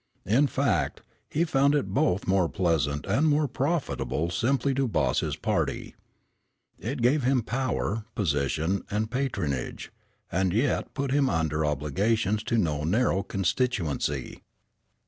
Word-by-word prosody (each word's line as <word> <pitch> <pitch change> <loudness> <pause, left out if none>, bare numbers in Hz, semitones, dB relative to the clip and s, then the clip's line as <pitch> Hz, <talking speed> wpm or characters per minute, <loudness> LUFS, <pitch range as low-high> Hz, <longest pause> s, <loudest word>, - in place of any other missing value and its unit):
In 125 +9 +3
fact, 135 -5 0 0.3
he 165 +3 +1
found 140 -2 +3
it 145 - -1
both 130 -9 +1
more 95 -3 +2
pleasant 80 -6 0
and 130 +11 +2
more 150 0 +3
profitable 135 - -1
simply 135 +6 +1
to 135 0 +1
boss 75 - +1
his - - -2
party. - - -2 0.9
It 125 +2 -3
gave 140 +5 +4
him 130 -1 +2
power, 115 -3 -2
position 80 +1 0
and 110 +2 -1
patronage, 100 - -2 0.4
and 95 0 +1
yet 120 +7 0
put 140 -2 -1
him 140 -1 +3
under 80 -1 0
obligations 95 +9 0
to 115 -2 +1
no 75 -7 0
narrow 95 +3 +2
constituency. 95 - -1
110 Hz, 130 wpm, -27 LUFS, 85-135 Hz, 0.9 s, gave